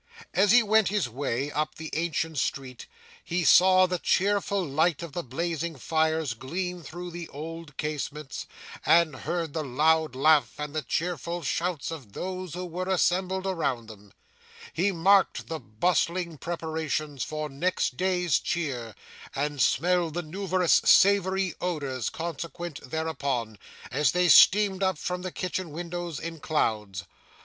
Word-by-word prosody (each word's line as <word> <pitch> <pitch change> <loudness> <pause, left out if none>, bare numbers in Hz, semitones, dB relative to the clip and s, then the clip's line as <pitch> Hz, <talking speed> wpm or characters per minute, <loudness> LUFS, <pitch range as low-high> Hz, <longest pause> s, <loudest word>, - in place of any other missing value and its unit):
As 200 +2 +3
he 245 0 +7
went 215 0 +4
his 205 -5 0
way, 135 +2 -2
up 155 +1 -2
the 160 -1 -7
ancient 160 -2 -1
street, 130 -2 -4 0.4
he 175 +1 -1
saw 185 +2 +6
the 180 -1 -2
cheerful 200 0 +1
light 160 +3 +1
of 170 - -7
the 175 - -2
blazing 165 +3 -3
fires 160 0 0
gleam 175 +9 -4
through 175 +2 -8
the 170 -1 -7
old 160 0 -8
casements, 150 -1 -4 0.4
and 165 -4 +4
heard 165 0 -3
the 160 - -2
loud 155 +2 +2
laugh 150 +2 +3
and 150 0 -5
the 155 - -1
cheerful 170 +4 -3
shouts 165 +1 -2
of 135 -11 -9
those 185 - -5
who 180 0 -4
were 180 +2 -4
assembled 190 +1 +1
around 140 -11 -1
them; 105 -2 -13 0.6
he 190 +5 +1
marked 190 +3 +3
the 160 -1 -3
bustling 170 - 0
preparations 155 -3 -3
for 155 0 -4
next 150 +6 -1
day's 180 -4 +1
cheer, 125 - -3 0.4
and 145 0 -1
smelled 170 +1 +2
the 175 - -2
numerous 185 +1 +2
savoury 190 -1 +4
odours 140 -8 -2
consequent 170 -2 -6
thereupon, 140 - -2 0.3
as 150 +3 +2
they 180 0 +3
steamed 200 +2 +6
up 190 -3 +1
from 180 +3 -3
the 185 0 -5
kitchen 185 -1 -3
windows 175 -1 -5
in 165 -1 -6
clouds. 105 - -1
165 Hz, 145 wpm, -27 LUFS, 145-180 Hz, 0.6 s, he